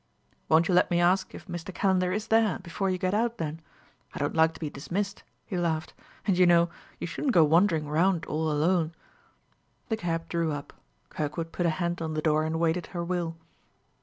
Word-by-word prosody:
"Won't 165 Hz, +1 st, +5 dB
you 185 Hz, -, +1 dB
let 180 Hz, -, +4 dB
me 175 Hz, -, +2 dB
ask 180 Hz, +2 st, +2 dB
if -, -, -10 dB
Mr. 175 Hz, 0 st, -6 dB
Calender 185 Hz, -1 st, +1 dB
is 210 Hz, +3 st, -3 dB
there, 225 Hz, -2 st, +3 dB
before 190 Hz, +2 st, -3 dB
you 185 Hz, -, 0 dB
get 185 Hz, +1 st, -1 dB
out, 230 Hz, +2 st, +1 dB
then? 160 Hz, 0 st, -4 dB, 0.5 s
I -, -, -4 dB
don't 145 Hz, -, -1 dB
like 160 Hz, 0 st, +3 dB
to -, -, -11 dB
be 160 Hz, -, -3 dB
dismissed," 195 Hz, +8 st, -4 dB, 0.2 s
he 185 Hz, -, -3 dB
laughed; 160 Hz, -2 st, -1 dB, 0.3 s
"and, 195 Hz, -, +2 dB
you 180 Hz, -, +6 dB
know, 170 Hz, 0 st, +4 dB, 0.3 s
you -, -, -4 dB
shouldn't 250 Hz, -, -2 dB
go 165 Hz, -, +8 dB
wandering 160 Hz, 0 st, +3 dB
round 165 Hz, +3 st, +2 dB
all 155 Hz, +1 st, -1 dB
alone." 160 Hz, +2 st, +1 dB, 1.0 s
The 220 Hz, -, 0 dB
cab 165 Hz, -4 st, -2 dB
drew 170 Hz, -2 st, 0 dB
up. 145 Hz, -1 st, -7 dB, 0.4 s
Kirkwood 160 Hz, +2 st, -3 dB
put 175 Hz, -, 0 dB
a 155 Hz, -, 0 dB
hand 175 Hz, -1 st, -1 dB
on 160 Hz, -1 st, -3 dB
the 155 Hz, -, 0 dB
door 155 Hz, 0 st, +2 dB
and 160 Hz, +1 st, -2 dB
awaited 165 Hz, +1 st, 0 dB
her 175 Hz, -1 st, -4 dB
will. 170 Hz, -2 st, -2 dB
170 Hz, 205 wpm, -28 LUFS, 160-185 Hz, 1.0 s, go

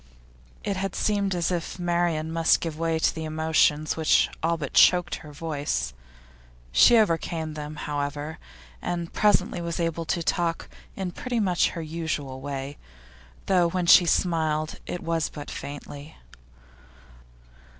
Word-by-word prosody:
It 200 Hz, -2 st, -2 dB
had 195 Hz, +1 st, -3 dB
seemed 200 Hz, -3 st, 0 dB
as 175 Hz, 0 st, 0 dB
if 175 Hz, 0 st, -3 dB
Marian 170 Hz, -3 st, 0 dB
must 165 Hz, 0 st, +3 dB
give 165 Hz, -2 st, -4 dB
way 165 Hz, -1 st, +1 dB
to 160 Hz, -, +2 dB
the 160 Hz, -, -5 dB
emotions 155 Hz, -1 st, +1 dB
which 160 Hz, -1 st, +3 dB
all 165 Hz, +1 st, +1 dB
but 145 Hz, -4 st, -5 dB
choked 180 Hz, -1 st, +5 dB
her 150 Hz, -, -12 dB
voice; 145 Hz, -, -3 dB, 0.8 s
she 235 Hz, -, +7 dB
overcame 165 Hz, -5 st, 0 dB
them, 150 Hz, 0 st, -6 dB
however, 145 Hz, +1 st, -4 dB, 0.4 s
and 170 Hz, -1 st, -3 dB
presently 210 Hz, -1 st, +2 dB
was 170 Hz, 0 st, -3 dB
able 165 Hz, -1 st, -1 dB
to 170 Hz, +1 st, -1 dB
talk 170 Hz, 0 st, -1 dB, 0.3 s
in 190 Hz, -2 st, -3 dB
pretty 245 Hz, +6 st, -3 dB
much 180 Hz, -5 st, +2 dB
her 165 Hz, -, -3 dB
usual 155 Hz, -5 st, -4 dB
way, 140 Hz, 0 st, -5 dB, 0.7 s
though 180 Hz, -3 st, +3 dB
when 180 Hz, 0 st, -1 dB
she 175 Hz, +1 st, +7 dB
smiled 160 Hz, -3 st, 0 dB
it 180 Hz, -, -5 dB
was 165 Hz, -1 st, 0 dB
but 145 Hz, -1 st, -8 dB
faintly. 145 Hz, +1 st, -8 dB
165 Hz, 140 wpm, -26 LUFS, 155-175 Hz, 0.8 s, she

